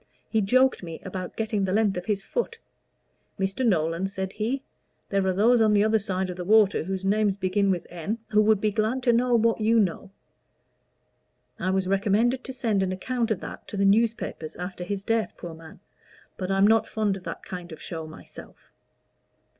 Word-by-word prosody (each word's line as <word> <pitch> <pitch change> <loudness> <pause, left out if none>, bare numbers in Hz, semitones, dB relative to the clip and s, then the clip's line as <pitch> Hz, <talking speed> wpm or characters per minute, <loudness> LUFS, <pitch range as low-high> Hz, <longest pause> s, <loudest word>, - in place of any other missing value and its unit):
He 220 - +1
joked 255 +6 +3
me 165 -3 -7
about 185 -1 -5
getting 215 -2 -1
the 190 - 0
length 210 -1 +2
of 180 0 -5
his 200 -2 0
foot. 460 - -3 0.8
'Mr. 195 +6 -1
Nolan,' 170 -4 +1
said 190 -1 -5
he, 240 +6 -2 0.5
'there 195 -1 +1
are 185 - +2
those 230 +5 +4
on 215 -1 +4
the 205 0 +4
other 220 +1 +3
side 190 -2 -2
of 180 - -8
the 180 - -4
water 205 -1 +4
whose 190 +1 -3
name 210 +1 +3
begins 195 +1 +1
with 180 -2 -2
N. 175 +6 -4
who 215 0 +4
would 215 -1 +4
be 215 +1 +1
glad 220 +5 0
to 240 -2 +4
know 245 +1 +3
what 230 0 +2
you 225 +2 +4
know.' 195 -1 -1 1.5
I 185 - -1
was 190 0 +1
recommended 210 +6 +2
to 265 - -5
send 225 -6 0
an 190 -1 0
account 235 +5 -2
of 215 -5 -1
that - - -8
to 205 - -6
the 200 - +2
newspapers 215 -6 +1
after 180 0 -6
his 195 +2 -4
death, 225 -3 0
poor 170 -1 -7
man! 160 +1 -13 0.6
but 185 -1 -4
I'm 195 0 +4
not 220 +1 +4
fond 210 -3 0
of 190 - -9
that - - -6
kind 180 -1 -7
of 160 - -9
show 160 -2 -6
myself." 155 - -13
200 Hz, 200 wpm, -26 LUFS, 185-220 Hz, 1.5 s, those